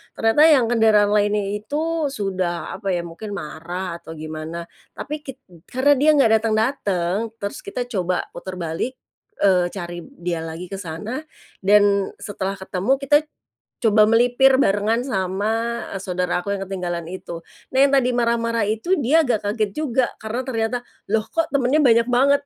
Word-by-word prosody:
ternyata 225 +7 +4
yang 260 -7 +4
kendaraan 215 -3 +4
lainnya 205 0 +2 0.2
itu 310 +7 -1
sudah 185 - -3
apa 200 - -7
ya 175 - -2
mungkin 200 +5 -7
marah 170 +2 -5
atau 160 - -10
gimana 155 +2 -6 0.3
tapi 300 +2 -5
kit 270 - -7 0.3
karena 260 +3 +2
dia 300 +3 +4
nggak 270 -6 +4
datang-datang 215 -3 0
terus 200 -3 -5
kita 385 -11 -3
coba 185 -5 0
puter 185 -1 -7
balik, 170 +8 -3 0.5
eee, 185 -3 +4
cari 175 -2 -5 0.2
dia 175 -1 -1
lagi 165 +2 -6
ke 195 - -4
sana 200 - -5 0.4
dan 200 0 +3
setelah 195 -1 -3
ketemu 190 +6 0
kita 275 +1 +3 0.7
coba 215 -1 +5
melipir 245 +3 +4
barengan 210 +2 +2
sama, 220 +4 -1
eee, - - -3
saudaraku 180 +1 -1
yang 195 -1 -4
ketinggalan 175 -3 -3
itu. 175 -2 -7 0.3
Nah - - 0
yang 280 - 0
tadi 250 -2 +2
marah-marah 230 -2 +1
itu 225 - 0
dia 295 +6 +4
agak 235 -5 +1
kaget 210 -1 0
juga 260 -5 +1 0.2
karena 220 +3 -3
ternyata, 230 -1 -1 0.3
"Loh 220 0 +2
kok 330 0 0
temannya 275 +2 +3
banyak 235 -4 +4
banget." 280 +3 +4
215 Hz, 155 wpm, -22 LUFS, 185-245 Hz, 0.7 s, coba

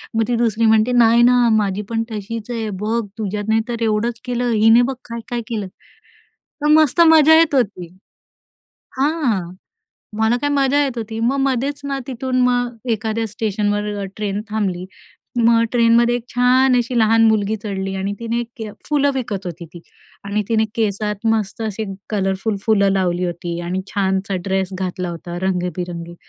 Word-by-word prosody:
मग 225 - +2
ती 245 - 0
दुसरी 230 -1 +1
म्हणते, 220 +2 +4
"नाही 235 -1 +5
ना, 250 +1 +5 0.2
माझी 200 -1 0
पण 225 0 -1
तशीच 215 +2 -6
आहे, 225 -2 -3
बघ 225 +2 0 0.2
तुझ्यात 210 -1 -3
नाही 220 0 +3
तर 235 -1 -4
एवढंच 225 +2 0
केलं, 245 -1 -1
हिने 225 +2 +5
बघ 265 - -3
काय-काय 235 +1 -5
केलं"? 210 -5 -3
तर 295 +9 -11
मस्त 310 +1 +4
मजा 320 0 +7
येत 315 -4 +3
होती 200 -8 0 1.1
हां. 265 - 0 0.7
मला 220 +2 +2
काय 290 - 0
मजा 285 0 +2
येत 265 -3 -3
होती, 225 0 -5
मग 245 +5 +1
मधेच 270 +1 0
ना 275 -1 -2
तिथून 255 0 -2
मग 245 -1 +1 0.2
एखाद्या 220 +1 -1
स्टेशनवर 210 0 -1 0.2
अ - - -3
ट्रेन 205 -1 -2
थांबली. 190 -4 -2 0.5
मग 230 0 +4
ट्रेनमध्ये 235 0 +4
एक 240 - -4
छान 255 +1 +3
अशी 240 +1 -1
लहान 225 +1 +4
मुलगी 215 0 +1
चढली 195 -2 -3
आणि 195 +1 -2
तिने 235 0 -2 0.5
फुलं 285 -1 +2
विकत 210 -7 -3
होती 170 -1 -6
ती. 170 - -10 0.4
आणि 205 +1 -1
तिने 220 -1 +2
केसात 210 -1 -2
मस्त 215 0 -3
असे 220 0 -3 0.3
कलरफुल 195 +1 -1
फुलं 200 -2 +3
लावली 180 -2 0
होती 170 0 -4
आणि 180 +2 -3
छानसा 190 0 0
ड्रेस 190 -1 0
घातला 180 -1 -3
होता 170 +1 -7
रंगी-बेरंगी, 180 -2 -3
220 Hz, 160 wpm, -19 LUFS, 195-245 Hz, 1.1 s, मजा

